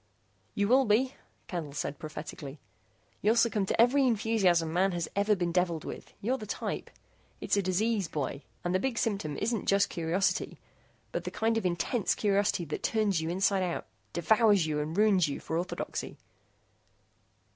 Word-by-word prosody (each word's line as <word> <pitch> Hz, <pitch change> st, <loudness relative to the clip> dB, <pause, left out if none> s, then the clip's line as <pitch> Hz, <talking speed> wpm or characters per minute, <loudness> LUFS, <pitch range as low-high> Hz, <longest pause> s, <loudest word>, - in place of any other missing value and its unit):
"You 200 Hz, 0 st, +1 dB
will 260 Hz, +4 st, +5 dB
be," 250 Hz, +5 st, +2 dB, 0.3 s
Candle 160 Hz, -6 st, -5 dB
said 145 Hz, -1 st, -4 dB
prophetically, 155 Hz, -2 st, -7 dB, 0.6 s
"you'll 215 Hz, +3 st, +3 dB
succumb 225 Hz, -4 st, +2 dB
to -, -, -1 dB
every 260 Hz, +3 st, +5 dB
enthusiasm 195 Hz, -8 st, +2 dB
man 185 Hz, +2 st, +2 dB
has 175 Hz, -1 st, -2 dB
ever 205 Hz, +1 st, +3 dB
been 175 Hz, -2 st, -1 dB
deviled 170 Hz, -2 st, 0 dB
with. -, -, -8 dB
You're 255 Hz, +6 st, 0 dB
the 215 Hz, -, -7 dB
type. -, -, -4 dB, 0.5 s
It's -, -, 0 dB
a 200 Hz, -, +2 dB
disease, 200 Hz, +1 st, 0 dB
boy, 145 Hz, -3 st, -3 dB, 0.2 s
and 175 Hz, -, -1 dB
the 185 Hz, -, +3 dB
big 245 Hz, +2 st, -1 dB
symptom 195 Hz, -11 st, -1 dB
isn't 230 Hz, -3 st, -1 dB
just 200 Hz, 0 st, +3 dB
curiosity, 170 Hz, +3 st, 0 dB, 0.5 s
but -, -, -3 dB
the -, -, -3 dB
kind 225 Hz, +1 st, 0 dB
of 220 Hz, -5 st, +1 dB
intense 180 Hz, +5 st, 0 dB
curiosity 200 Hz, -3 st, +1 dB
that 150 Hz, -, -4 dB
turns 210 Hz, -6 st, +1 dB
you 160 Hz, -, -2 dB
inside 190 Hz, +2 st, +2 dB
out, 180 Hz, -2 st, -2 dB, 0.3 s
devours 205 Hz, +1 st, +4 dB
you 150 Hz, -1 st, -1 dB
and 155 Hz, +4 st, -3 dB
ruins 200 Hz, -5 st, +4 dB
you 140 Hz, -, -4 dB
for 160 Hz, -, -4 dB
orthodoxy." 175 Hz, +2 st, -4 dB
195 Hz, 165 wpm, -30 LUFS, 170-220 Hz, 0.6 s, will